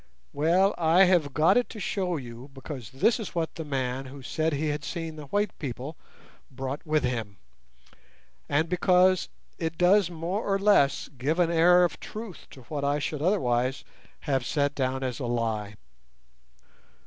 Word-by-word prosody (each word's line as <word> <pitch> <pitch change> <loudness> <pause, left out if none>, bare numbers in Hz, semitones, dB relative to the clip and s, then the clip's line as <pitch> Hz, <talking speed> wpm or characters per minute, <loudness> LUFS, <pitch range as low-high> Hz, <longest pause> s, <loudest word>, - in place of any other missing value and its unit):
"Well, 175 +7 +3
I 170 +3 +5
have 175 -6 +3
got 155 - +4
it 245 - +1
to 215 - -8
show 185 -2 -1
you, 120 0 -9
because 135 -4 -7
this 140 - +2
is 210 -4 -6
what 165 -2 -1
the 165 - -6
man 135 -2 -2
who 135 +1 -10
said 160 +5 -1
he 150 +1 -1
had 145 -1 -3
seen 165 -1 -5
the 150 -1 -9
white 205 +5 -1
people 135 +2 -5 0.5
brought 135 +1 -5
with 155 0 +2
him, 115 -6 -3 1.1
and 155 +3 +2
because 180 +1 +3 0.3
it 165 -1 -3
does 185 +1 +4
more 175 +5 -3
or 195 -1 +1
less 195 -9 +3
give 150 +6 0
an 175 -2 +2
air 175 +2 +6
of 170 -4 -1
truth 215 -4 -8
to 130 - -13
what 140 +4 -5
I 140 +1 +1
should 150 0 -3
otherwise 130 -8 +1 0.4
have 135 -4 0
set 145 +3 0
down 130 -1 -1
as 125 -3 -3
a 125 - -3
lie. 110 -3 -2
150 Hz, 170 wpm, -27 LUFS, 130-180 Hz, 1.1 s, air